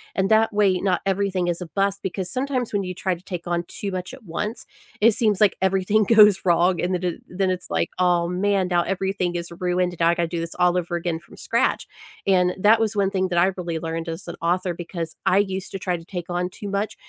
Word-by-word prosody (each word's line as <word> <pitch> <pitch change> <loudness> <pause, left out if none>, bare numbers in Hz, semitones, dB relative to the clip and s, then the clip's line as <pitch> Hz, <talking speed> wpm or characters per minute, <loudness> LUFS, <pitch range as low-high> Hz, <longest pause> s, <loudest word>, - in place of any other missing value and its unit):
and 195 +2 +1
that 220 +1 +4
way 200 -3 +3
not 185 -3 +1
everything 195 -2 0
is 175 +1 -2
a 180 - -5
bust. 195 +4 0
Because 185 -1 -4
sometimes 255 -3 -2
when 200 - +1
you 185 -1 -5
try 190 0 -1
to 175 - -8
take 180 -3 -6
on 175 0 -1
too 200 - -5
much 185 +6 -5
at 260 - -17
once, 210 +6 -4 0.4
it 230 +2 +7
seems 210 -3 +1
like 210 -4 +4
everything 190 +3 +2
goes 210 -3 +7
wrong, 175 +1 +3
and 180 +1 0
then 180 - -4
it 175 -2 -2
then 185 +1 0
it's, 180 -1 -5
like, - - 0
"Oh, 175 -1 +3
man, 190 +1 0
now 175 -1 +3
everything 190 -1 -1
is 170 0 -4
ruined, 180 0 0
and 175 - -13
now 165 - +4
I 170 - +3
gotta 170 -1 0
do 170 0 -3
this 165 0 -5
all 180 0 +3
over 175 0 -4
again 170 -1 -2
from 170 - -17
scratch." - - 0 0.4
And 180 -2 +3
that 215 +3 +5
was 220 -1 0
one 195 -1 +1
thing 190 -1 0
that 175 -1 -2
I 185 +3 +4
really 175 -3 -3
learned 165 +1 -4
as 165 +3 -6
an 170 - -5
author 180 +1 0
because 170 -1 -6
I 190 - +4
used 190 -2 -2
to - - -2
try 180 -1 -1
to 165 - -13
take 180 -2 -6
on 180 +1 -1
too 200 +2 -8
much 200 +2 -2
185 Hz, 250 wpm, -23 LUFS, 175-200 Hz, 0.4 s, it